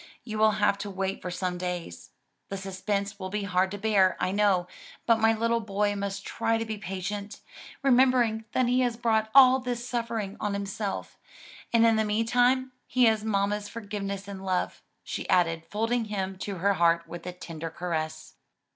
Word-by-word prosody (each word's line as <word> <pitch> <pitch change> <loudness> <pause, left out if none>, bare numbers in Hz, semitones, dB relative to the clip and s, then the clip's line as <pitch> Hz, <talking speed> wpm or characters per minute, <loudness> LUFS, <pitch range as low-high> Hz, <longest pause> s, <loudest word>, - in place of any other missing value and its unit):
You 215 -3 -5
will 215 0 +5
have 205 -1 +2
to 205 - -4
wait 195 0 -3
some 180 0 -3
days. 175 - -5 0.4
The 195 - -4
suspense 200 +2 -3
will 185 -1 -4
be 210 +1 -2
hard 185 -1 +1
to 205 - -5
bear, 200 -3 +3
I 185 - 0
know, 195 -3 +2 0.4
but 230 -1 +4
my 225 0 +5
little 230 +1 +1
boy 205 -1 0
must 200 -1 -4
try 225 0 0
to 225 - -2
be 220 -1 -5
patient, 200 +1 -5 0.4
remembering 250 -4 +4
that 255 - +3
he 250 +1 +2
has 240 -2 0
brought 220 -2 +1
all 260 -1 +8
this 245 -1 -4
suffering 230 -5 -3
on 210 -2 -1
himself. 200 0 -4 0.5
And 230 -1 +5
in 225 -1 +4
the 220 - +3
meantime 245 +4 +2 0.2
he 255 0 +2
has 220 -2 +4
mamma's 205 -1 0
forgiveness 200 -3 -5
and 195 -1 -7
love," 185 -1 -1 0.2
she - - -5
added 165 -2 +2
folding 225 +2 0
him 195 -2 -3
to 200 0 -4
her 200 +3 +2
heart 170 -1 +2
with 170 +1 -8
a - - -2
tender 165 -2 -7
caress. 160 -2 -4
205 Hz, 180 wpm, -27 LUFS, 190-225 Hz, 0.5 s, all